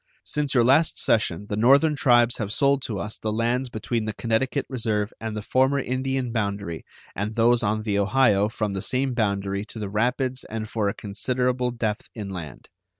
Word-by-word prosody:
Since 145 Hz, -2 st, -1 dB
your 120 Hz, -, +5 dB
last 140 Hz, +7 st, +4 dB
session 105 Hz, -4 st, +1 dB
the 105 Hz, -, -3 dB
Northern 140 Hz, +8 st, +4 dB
tribes 120 Hz, -4 st, +4 dB
have 105 Hz, -2 st, -3 dB
sold 140 Hz, +3 st, +2 dB
to 110 Hz, -, -3 dB
us 105 Hz, +2 st, -5 dB
the 110 Hz, -, -2 dB
lands 120 Hz, +4 st, 0 dB
between 115 Hz, 0 st, -2 dB
the 110 Hz, -, -3 dB
Connecticut 120 Hz, +5 st, -1 dB
Reserve 110 Hz, -4 st, -1 dB
and 110 Hz, -1 st, -4 dB
the 105 Hz, -, -5 dB
former 130 Hz, +5 st, +2 dB
Indian 130 Hz, -1 st, -2 dB
boundary 100 Hz, -6 st, -3 dB, 0.3 s
and 105 Hz, +2 st, -3 dB
those 120 Hz, +1 st, +4 dB
on 110 Hz, 0 st, 0 dB
the 105 Hz, -2 st, 0 dB
Ohio 105 Hz, -2 st, +3 dB
from 105 Hz, -3 st, -2 dB
the 95 Hz, -, -3 dB
same 130 Hz, +3 st, 0 dB
boundary 100 Hz, -3 st, -1 dB
to 115 Hz, -, -11 dB
the 105 Hz, -3 st, -4 dB
rapids 125 Hz, +4 st, 0 dB
and 110 Hz, 0 st, -5 dB
for 105 Hz, -2 st, -1 dB
a -, -, -4 dB
considerable 125 Hz, +4 st, -1 dB
depth 110 Hz, -3 st, -3 dB
inland. 95 Hz, -, -7 dB
115 Hz, 185 wpm, -24 LUFS, 105-125 Hz, 0.3 s, your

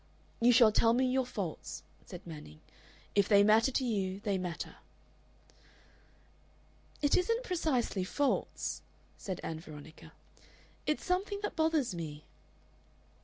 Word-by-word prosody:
"You 240 Hz, +1 st, +6 dB
shall 230 Hz, -2 st, +7 dB
tell 225 Hz, +2 st, +4 dB
me 255 Hz, +2 st, +3 dB
your 255 Hz, 0 st, +1 dB
faults," 160 Hz, -, -5 dB, 0.2 s
said 180 Hz, -, -9 dB
Manning. 150 Hz, -, -10 dB, 0.5 s
"If 200 Hz, -1 st, +3 dB
they 200 Hz, -1 st, +7 dB
matter 220 Hz, +4 st, +5 dB
to 265 Hz, 0 st, 0 dB
you, 195 Hz, -5 st, -1 dB
they 200 Hz, -3 st, 0 dB
matter." 175 Hz, -2 st, -5 dB, 2.3 s
"It 290 Hz, -, +4 dB
isn't 460 Hz, +7 st, +1 dB
precisely 290 Hz, -, 0 dB
faults," 280 Hz, +9 st, -1 dB, 0.3 s
said 190 Hz, -3 st, -5 dB
Ann 160 Hz, -1 st, -4 dB
Veronica. 155 Hz, -1 st, -12 dB, 0.8 s
"It's 305 Hz, -, 0 dB
something 390 Hz, +3 st, 0 dB
that 415 Hz, -, -2 dB
bothers 315 Hz, -, +2 dB
me." 155 Hz, -3 st, -6 dB
215 Hz, 120 wpm, -32 LUFS, 175-280 Hz, 2.3 s, shall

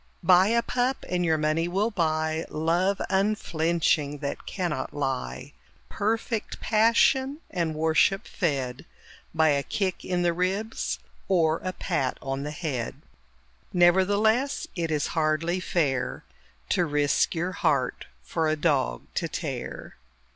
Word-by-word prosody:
Buy 180 Hz, +2 st, +6 dB
a 235 Hz, +2 st, +2 dB
pup 255 Hz, +2 st, -1 dB
and 180 Hz, 0 st, 0 dB
your 160 Hz, -2 st, +2 dB
money 155 Hz, +2 st, +1 dB
will 200 Hz, +6 st, 0 dB
buy 160 Hz, -3 st, 0 dB
Love 175 Hz, +5 st, +1 dB
unflinching 170 Hz, -6 st, +1 dB
that 140 Hz, -1 st, -5 dB
cannot 170 Hz, -8 st, -3 dB
lie 130 Hz, -, -3 dB, 0.4 s
Perfect 220 Hz, +1 st, -2 dB
passion 260 Hz, +5 st, +3 dB
and 170 Hz, -4 st, -1 dB
worship 160 Hz, +6 st, +2 dB
fed 135 Hz, -, -2 dB, 0.5 s
By 160 Hz, -1 st, +4 dB
a 140 Hz, -1 st, +2 dB
kick 185 Hz, +5 st, -2 dB
in 180 Hz, -1 st, -1 dB
the 170 Hz, -1 st, +2 dB
ribs 190 Hz, +6 st, -1 dB, 0.3 s
or 165 Hz, -4 st, +2 dB
a 185 Hz, -, -1 dB
pat 135 Hz, -7 st, -2 dB
on 135 Hz, 0 st, -3 dB
the 145 Hz, -, -4 dB
head. 145 Hz, -6 st, -3 dB, 0.8 s
Nevertheless 205 Hz, +9 st, +3 dB
it 170 Hz, -3 st, -1 dB
is 150 Hz, -2 st, 0 dB
hardly 160 Hz, +3 st, +1 dB
fair 150 Hz, -7 st, -1 dB, 0.5 s
To 175 Hz, -, +2 dB
risk 145 Hz, +3 st, +1 dB
your 175 Hz, +3 st, -1 dB
heart 145 Hz, -8 st, 0 dB, 0.2 s
for 165 Hz, -2 st, -1 dB
a 155 Hz, -, +2 dB
dog 145 Hz, -, 0 dB
to -, -, -1 dB
tear. -, -, -5 dB
170 Hz, 130 wpm, -26 LUFS, 155-190 Hz, 0.8 s, Buy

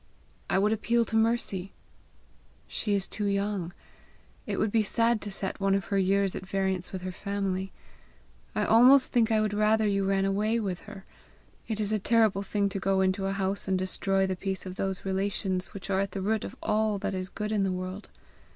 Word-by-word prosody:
"I -, -, +2 dB
would 210 Hz, +3 st, +3 dB
appeal 230 Hz, +2 st, +1 dB
to 225 Hz, -, -4 dB
Mercy." 220 Hz, -4 st, 0 dB, 0.9 s
"She 205 Hz, -2 st, -1 dB
is 195 Hz, -2 st, -1 dB
too 210 Hz, -, -3 dB
young. 200 Hz, -3 st, -1 dB, 0.8 s
It -, -, -2 dB
would 215 Hz, -, +1 dB
be 225 Hz, -, +3 dB
sad 230 Hz, +2 st, +1 dB
to 205 Hz, -, -5 dB
set 190 Hz, 0 st, -4 dB
one 195 Hz, 0 st, +2 dB
of 195 Hz, -, -1 dB
her -, -, +3 dB
years 195 Hz, 0 st, +2 dB
at -, -, -5 dB
variance 190 Hz, -1 st, -1 dB
with 185 Hz, -1 st, -6 dB
her 185 Hz, -, -3 dB
family. 195 Hz, -1 st, -3 dB, 0.8 s
I -, -, +1 dB
almost 255 Hz, +4 st, +6 dB
think 230 Hz, -3 st, +3 dB
I 220 Hz, -, +4 dB
would 215 Hz, -1 st, 0 dB
rather 215 Hz, +1 st, +3 dB
you 200 Hz, -1 st, +1 dB
ran 195 Hz, 0 st, +1 dB
away 210 Hz, +4 st, +1 dB
with 190 Hz, -5 st, -4 dB
her. 200 Hz, -2 st, -10 dB, 0.6 s
It 220 Hz, -2 st, -2 dB
is 210 Hz, -1 st, 0 dB
a 215 Hz, -, +1 dB
terrible 220 Hz, -2 st, +3 dB
thing 200 Hz, 0 st, 0 dB
to 195 Hz, -, -3 dB
go 195 Hz, 0 st, +1 dB
into 190 Hz, +1 st, +1 dB
a 195 Hz, -, -1 dB
house 195 Hz, 0 st, -1 dB
and 190 Hz, -1 st, +2 dB
destroy 190 Hz, +1 st, 0 dB
the 190 Hz, -1 st, -1 dB
peace 190 Hz, +1 st, -4 dB
of 185 Hz, -, -5 dB
those 195 Hz, -1 st, -3 dB
relations 190 Hz, -1 st, -1 dB
which 200 Hz, 0 st, -8 dB
are 190 Hz, -, +2 dB
at 195 Hz, -1 st, -2 dB
the 195 Hz, -, -3 dB
root 215 Hz, +1 st, 0 dB
of -, -, -7 dB
all 215 Hz, -1 st, +1 dB
that 195 Hz, -, -3 dB
is 185 Hz, 0 st, -3 dB
good 210 Hz, +2 st, -4 dB
in 210 Hz, -2 st, +1 dB
the 195 Hz, -1 st, +1 dB
world." 185 Hz, +2 st, -5 dB
195 Hz, 210 wpm, -28 LUFS, 190-215 Hz, 0.9 s, almost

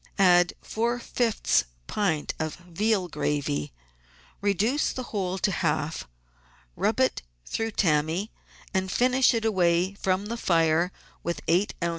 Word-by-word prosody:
Add 175 Hz, -3 st, +5 dB
four 235 Hz, +2 st, -1 dB
fifths 230 Hz, -, +1 dB, 0.2 s
pint 175 Hz, -8 st, -1 dB
of 155 Hz, -1 st, -2 dB
veal 185 Hz, +3 st, -1 dB
gravy, 140 Hz, -, -2 dB, 0.7 s
reduce 205 Hz, -, +1 dB
the 255 Hz, -, -5 dB
whole 190 Hz, -2 st, -1 dB
to 195 Hz, -, +1 dB
half, 160 Hz, -, -1 dB, 0.7 s
rub -, -, 0 dB
it -, -, +2 dB, 0.2 s
through 225 Hz, 0 st, -2 dB
tammy, 165 Hz, +4 st, +1 dB, 0.4 s
and 190 Hz, -1 st, 0 dB
finish 255 Hz, +3 st, +4 dB
it 225 Hz, -1 st, -1 dB
away 180 Hz, -3 st, +2 dB
from 195 Hz, 0 st, -1 dB
the 230 Hz, +3 st, -4 dB
fire 165 Hz, -2 st, +2 dB, 0.3 s
with 170 Hz, 0 st, -3 dB
eight 180 Hz, +5 st, +2 dB
oz. 170 Hz, -, +1 dB
185 Hz, 130 wpm, -26 LUFS, 170-215 Hz, 0.7 s, Add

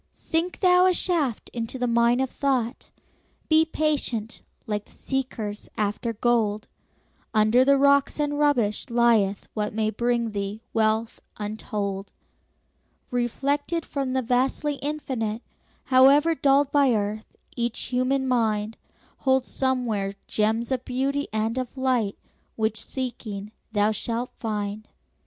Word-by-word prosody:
Sink 335 Hz, +3 st, -2 dB
thou 365 Hz, -1 st, +6 dB
a 365 Hz, -, +3 dB
shaft 310 Hz, -, 0 dB
into 230 Hz, +2 st, -4 dB
the 250 Hz, -, -1 dB
mine 235 Hz, +1 st, +3 dB
of 265 Hz, -, -1 dB
thought; 260 Hz, -4 st, -1 dB, 0.6 s
Be 315 Hz, 0 st, +6 dB
patient, 285 Hz, -8 st, -1 dB, 0.2 s
like 210 Hz, -3 st, -3 dB
the -, -, -20 dB
seekers 235 Hz, -6 st, -4 dB
after 215 Hz, +3 st, -1 dB
gold; 220 Hz, -2 st, 0 dB, 0.7 s
Under 215 Hz, +4 st, +5 dB
the 280 Hz, +1 st, +4 dB
rocks 280 Hz, +1 st, +3 dB
and 290 Hz, 0 st, 0 dB
rubbish 245 Hz, -9 st, +1 dB
lieth 230 Hz, -5 st, +2 dB
what 210 Hz, -1 st, -2 dB
May 220 Hz, -1 st, +1 dB
bring 235 Hz, 0 st, 0 dB
thee 200 Hz, +2 st, -4 dB
wealth 220 Hz, +1 st, +1 dB, 0.2 s
untold. 205 Hz, -2 st, -4 dB, 1.0 s
Reflected 280 Hz, +7 st, -1 dB
from 270 Hz, -2 st, -3 dB
the 260 Hz, 0 st, 0 dB
vastly 265 Hz, +4 st, 0 dB
Infinite, 255 Hz, -7 st, -3 dB, 0.4 s
However 275 Hz, +5 st, +5 dB
dulled 280 Hz, -2 st, +3 dB
by 275 Hz, -5 st, +4 dB
earth, 210 Hz, +1 st, -3 dB, 0.2 s
each 235 Hz, -1 st, -2 dB
human 260 Hz, +2 st, 0 dB
mind 220 Hz, -3 st, 0 dB, 0.4 s
Holds 265 Hz, -1 st, +2 dB
somewhere 240 Hz, -7 st, 0 dB
gems 220 Hz, +3 st, 0 dB
of 255 Hz, -1 st, -1 dB
beauty 275 Hz, +3 st, -1 dB
and 220 Hz, +3 st, -1 dB
of 255 Hz, +1 st, -6 dB
light 250 Hz, -6 st, 0 dB, 0.4 s
Which, 220 Hz, -1 st, -1 dB
seeking, 215 Hz, -6 st, -5 dB, 0.2 s
thou 210 Hz, 0 st, +2 dB
shalt 235 Hz, +3 st, -3 dB
find. 210 Hz, -1 st, -3 dB
240 Hz, 125 wpm, -25 LUFS, 215-270 Hz, 1.0 s, thou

